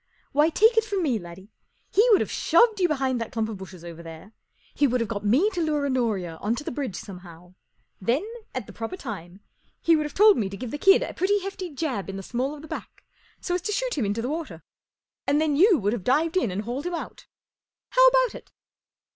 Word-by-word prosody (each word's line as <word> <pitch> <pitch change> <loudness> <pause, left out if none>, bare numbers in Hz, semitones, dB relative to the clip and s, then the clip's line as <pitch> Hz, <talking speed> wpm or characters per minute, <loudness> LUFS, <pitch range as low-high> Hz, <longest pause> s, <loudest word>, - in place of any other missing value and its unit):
Why, 295 +3 +4
take 445 +7 +4
it 450 - +5
from 405 -4 -2
me, 255 -8 +1
laddie, 180 +3 -12 0.4
he 445 +5 +4
would 420 - +6
have - - -2
shoved 455 -3 +3
you 360 - +4
behind 265 -5 0
that 230 - -5
clump 225 -1 -1
of 215 - -5
bushes 185 -2 -11
over 170 -1 -9
there; 165 +5 -11 0.4
he 285 - +3
would 250 0 0
have 230 - -1
got 205 -1 -4
me 270 - +3
to 355 - -2
lure 300 -3 0
Honoria 215 -11 -1
on 215 +6 -1
to 265 - -6
the - - -4
bridge 260 -7 -4
somehow; 180 -3 -10 0.5
then, 245 - +1 0.3
at - - -3
the - - -12
proper 230 +11 -5
time, 195 - -8 0.4
he 330 - +4
would 305 -1 0
have 295 - -13
told 420 0 +7
me 200 -3 -1
to 195 - -7
give 245 0 -6
the 295 - -4
kid 390 +4 +6
a - - -5
pretty 400 +2 +1
hefty 380 -1 -5
jab 270 - -3
in 195 - -5
the 195 - -7
small 255 +7 -2
of 295 - -12
the - - -9
back, - - -8 0.4
so 355 - -2
as 360 - 0
to 420 - -3
shoot - - -1
him 270 - -1
into 205 +3 -2
the 250 - -2
water; 320 +1 -5 0.6
and 285 +1 +3
then 310 -2 +1
you 370 +4 +6
would 205 -3 0
have 230 -6 -4
dived 315 - +1
in 365 - +2
and 190 +3 -3
hauled 255 +8 -4
him 355 - -2
out. - - -8 0.6
How - - +4
about - - +4
it - - -12
270 Hz, 240 wpm, -25 LUFS, -, 0.6 s, told